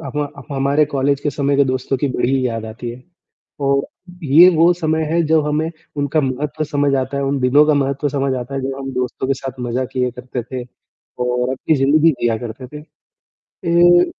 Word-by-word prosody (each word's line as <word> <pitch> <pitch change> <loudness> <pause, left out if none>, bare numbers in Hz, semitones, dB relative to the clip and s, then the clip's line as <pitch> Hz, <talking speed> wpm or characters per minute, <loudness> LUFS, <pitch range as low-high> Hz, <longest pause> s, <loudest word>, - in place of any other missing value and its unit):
हमा 145 +2 -3 0.3
ह - - -3
हमारे 140 +3 +2
कॉलेज 140 +1 +1
के 145 - -1
समय 140 0 0
के 140 - +4
दोस्तों 130 +1 -1
की 140 +2 -1
बड़ी 130 +1 0
याद 115 -2 -3
आती 115 +2 -6
है, 120 +2 -11 0.6
और 140 0 +1 0.4
ये 155 +6 +7
वो 165 +2 +5
समय 160 -1 -1
है 170 0 +3
जब 155 -1 +2
हमें 155 +2 0 0.3
उनका 145 +2 +1
महत्व 145 +3 -2
समझ 145 -2 0
आता 130 +1 -1
है, 140 - -1
उन 140 +1 0
दिनों 130 +4 +5
का 150 - +3
महत्व 140 +1 0
समझ 135 -1 -1
आता 125 +3 -6
है 135 - -2
जब 135 0 -3
हम 135 0 -5
दोस्तों 125 +1 -2
के 135 - +2
साथ 130 -1 -7
मज़ा 125 +1 -2
किए 125 -1 0
करते 125 0 -5
थे, 125 +1 -6 0.5
और 125 0 0
अपनी 150 +4 0
ज़िंदगी 150 +4 +4
जिया 115 -1 +1
करते 120 +2 -7
थे। 150 - -9 0.7
ये 175 0 +3
135 Hz, 205 wpm, -18 LUFS, 130-150 Hz, 0.7 s, ये